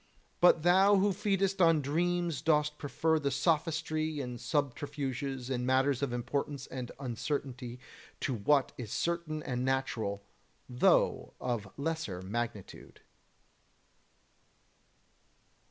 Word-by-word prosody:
But 175 -3 +5
thou 190 +3 +6
who 200 +1 +3
feedest 195 -1 0
on 165 -2 +6
dreams 170 +2 0
dost 150 -1 +2
prefer 160 +2 +1
the 140 -2 0
sophistry 155 +2 0
and 125 -3 -5
subterfuges 135 -1 -2
in 125 -1 -1
matters 130 +1 +2
of 140 -3 0
importance 140 +3 -3
and 125 -2 -6
uncertainty 125 0 -4 0.4
to 135 - 0
what 135 +5 +2
is 110 -4 -6
certain 170 -3 -2
and 125 -2 -2
natural, 120 -6 -1 0.4
though - - +2
of 110 -6 -3
lesser 140 - -3
magnitude. 110 0 -5
140 Hz, 105 wpm, -31 LUFS, 125-160 Hz, 0.4 s, thou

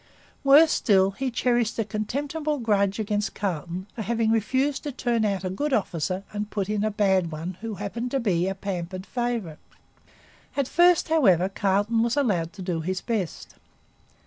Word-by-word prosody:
Worse 295 +3 +7
still, 195 -3 +3
he 260 +7 -3
cherished 240 -2 0
a 225 - 0
contemptible 290 +9 -2
grudge 205 -5 +1
against 210 -1 -2
Carleton 175 -1 -3
for 230 - -5
having 225 0 0
refused 260 +6 +1
to 295 - -4
turn 240 -3 0
out 200 -3 0
a 185 - -2
good 285 +9 -2
officer 185 -3 -1
and 210 0 -3
put 200 -2 -3
in 210 -1 0
a 215 - +2
bad 190 -5 +1
one 165 +4 -5
who 225 -2 -4
happened 220 +5 -4
to 270 - 0
be 185 -7 +1
a 195 - -2
pampered 185 -1 -5
favourite. 235 -11 -3 1.0
At 280 -3 +1
first, 350 +1 +4
however, 195 - +4
Carleton 205 +4 +1
was 235 +4 0
allowed 185 - +1
to 190 -1 -8
do 175 -3 -2
his 185 +3 -2
best. 210 - -4
210 Hz, 170 wpm, -25 LUFS, 190-240 Hz, 1.0 s, Worse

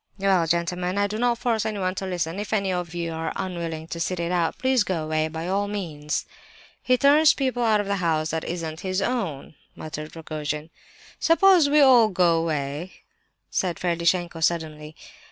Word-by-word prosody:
"Well—gentlemen—I 180 0 +1
do 210 +2 -3
not 240 0 +2
force 235 -3 0
anyone 200 -4 -2
to 190 0 -5
listen! 175 0 -2
If 210 +1 -4
any 195 -3 +1
of 175 -2 -4
you 170 -1 -3
are 160 0 -3
unwilling 170 -4 -4
to 170 - -5
sit 180 +1 -2
it 170 0 -2
out, 170 -2 0
please 260 -3 +2
go 180 -5 -2
away, 155 0 0
by 160 +2 -5
all 200 +2 0
means!" 160 -8 -3 0.6
"He 255 0 +2
turns 295 +3 +5
people 260 -3 -1
out 220 -3 +3
of 205 - -2
a 200 0 0
house 160 -3 0
that 160 0 -2
isn't 165 -2 -4
his 185 0 -2
own," 195 - -3 0.2
muttered 155 0 -7
Rogojin. 155 -1 -5 0.5
"Suppose 335 -2 +5
we 300 +1 +5
all 250 -5 +7
go 175 -3 +3
away?" 155 +1 -3 0.6
said 180 -3 -1
Ferdishenko 170 0 0
suddenly. 155 -2 -2
180 Hz, 170 wpm, -24 LUFS, 160-205 Hz, 0.6 s, all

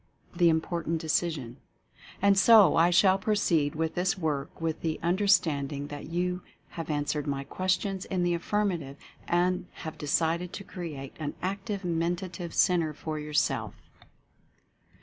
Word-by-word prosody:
THE 170 -1 +5
IMPORTANT 165 0 -1
DECISION. 155 -5 -1 0.7
And 200 0 +6
so 210 0 +7
I 165 +1 +5
shall 190 +2 +4
proceed 170 -8 +1
with 160 0 -1
this 180 +2 0
work 150 -5 -3
with 165 -1 -2
the 160 -2 -2
un 170 +2 +2
derstanding 150 -8 +1
that 145 0 -7
you 180 +2 -1 0.3
have 165 -1 -7
answered 145 0 -1
my 140 -1 -2
questions 185 +5 -1
in 185 -2 -1
the 175 0 +2
affirmative 170 -6 -1 0.3
and 180 +1 +1 0.2
have 160 - -6
decided 165 +4 0
to 200 - -6
Create 150 -9 -7
an 150 -2 -4
Active 195 +1 -3
Mentative 175 0 -2
Centre 165 -5 +2
for 155 0 -4
Yourself. 150 0 -1
170 Hz, 140 wpm, -28 LUFS, 155-185 Hz, 0.7 s, so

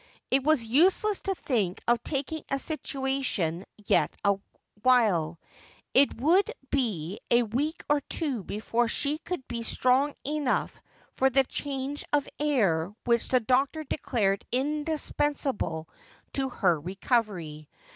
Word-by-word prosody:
It 265 0 +3
was 305 -4 +3
useless 365 - +3
to 390 - -1
think 210 - -1
of 235 0 +3
taking 295 +2 -2
a 275 - +1
situation 265 - -2 0.2
yet 155 -6 +3
awhile; 200 -4 +1 0.5
it 275 -3 +4
would 340 +10 +3 0.2
be 205 - -1
a 240 0 +5
week 275 +9 -2
or 295 -1 +3
two 270 - -2
before 230 +5 -1
she 290 +6 0
could 345 -6 -5
be 235 -1 -4
strong 255 +5 +2
enough 295 -2 -1 0.4
for 265 - +4
the 270 +1 +4
change 275 +1 -4
of 290 -1 +2
.air 200 - +2
which 235 -1 +2
the 255 -1 +3
doctor 270 +6 +1
declared 210 -9 0
indispensable 285 - -1 0.5
to 270 -1 0
her 180 -9 +2
recovery. 180 - -2
255 Hz, 125 wpm, -28 LUFS, 205-290 Hz, 0.5 s, a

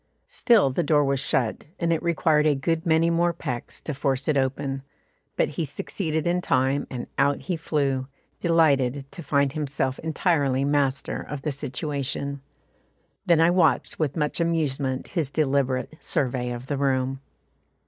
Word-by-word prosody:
Still 215 - +4
the 130 - 0
door 145 -2 +3
was 135 -1 +1
shut, 130 -1 -1
and 170 -1 +2
it 160 - -1
required 160 -3 +2
a 150 - +3
good 160 +5 -1
many 165 +1 +3
more 170 +1 +2
pecks 130 -8 -5
to 155 - -4
force 135 0 -1
it 155 - +2
open, 135 0 -1 0.5
but - - +1
he 155 +3 -3
succeeded 155 +2 -3
in 175 +1 +1
time, 135 -2 +1
and 125 -2 -5
out 140 0 +2
he 180 - -2
flew 140 -5 -1 0.3
delighted 145 -6 +2
to 175 - -9
find 140 -2 +1
himself 135 -3 -2
entirely 145 -5 +1
master 140 -2 0
of 145 -2 -7
the 150 - -1
situation. 140 0 -3 0.9
Then 170 -2 +5
I 165 +1 +5
watched 165 -7 +2
with 155 -1 -1
much 150 +1 0
amusement 145 -6 -1
his 165 -7 -1
deliberate 140 -2 0
survey 125 -2 -1
of 120 +1 -5
the 140 0 -3
room. 135 -1 0
145 Hz, 160 wpm, -25 LUFS, 135-160 Hz, 0.9 s, Then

